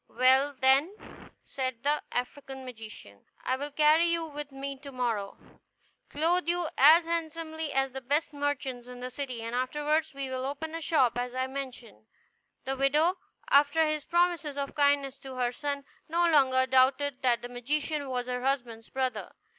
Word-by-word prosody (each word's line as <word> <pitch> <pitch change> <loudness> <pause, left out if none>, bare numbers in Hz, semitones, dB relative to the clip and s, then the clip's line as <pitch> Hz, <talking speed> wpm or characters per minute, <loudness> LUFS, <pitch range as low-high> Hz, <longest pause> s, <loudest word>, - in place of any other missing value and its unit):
"Well, 265 +3 +3
then," 275 +9 +4 0.5
said 255 -3 -4
the 295 +1 +1
African 265 +1 -4
magician, 220 - -11 0.2
"I 255 - +1
will 285 +2 -4
carry 305 +3 +4
you 335 -1 0
with 295 -2 -7
me 275 0 -6
to 280 0 -10
morrow, 230 -6 -2 0.7
clothe 335 +3 +1
you 345 -1 0
as 320 +5 +7
handsomely 320 -2 -3
as 270 0 +1
the 265 +1 -6
best 290 +5 0
merchants 280 -4 -3
in 250 0 -10
the 250 +1 -6
city, 255 -4 -5
and 230 +1 -5
afterward 295 +5 0
we 275 -1 -3
will 260 0 -4
open 290 +4 -4
a 330 - -4
shop 260 -8 +2
as 245 0 -4
I 260 0 0
mentioned." 260 -5 -8 0.6
The 270 - -1
widow, 300 +7 +2 0.3
after 290 +3 +5
his 305 -1 -2
promises 345 -4 +1
of 280 -1 -3
kindness 285 -2 +2
to 265 -1 -9
her 245 -1 0
son, 280 +1 -4 0.2
no 340 +2 +3
longer 260 -5 +4
doubted 260 +1 +2
that 245 -2 +2
the 245 - -6
magician 285 +4 -2
was 250 -1 -2
her 250 0 -3
husband's 245 -4 -2
brother. 255 -5 -3
275 Hz, 170 wpm, -29 LUFS, 255-300 Hz, 0.7 s, as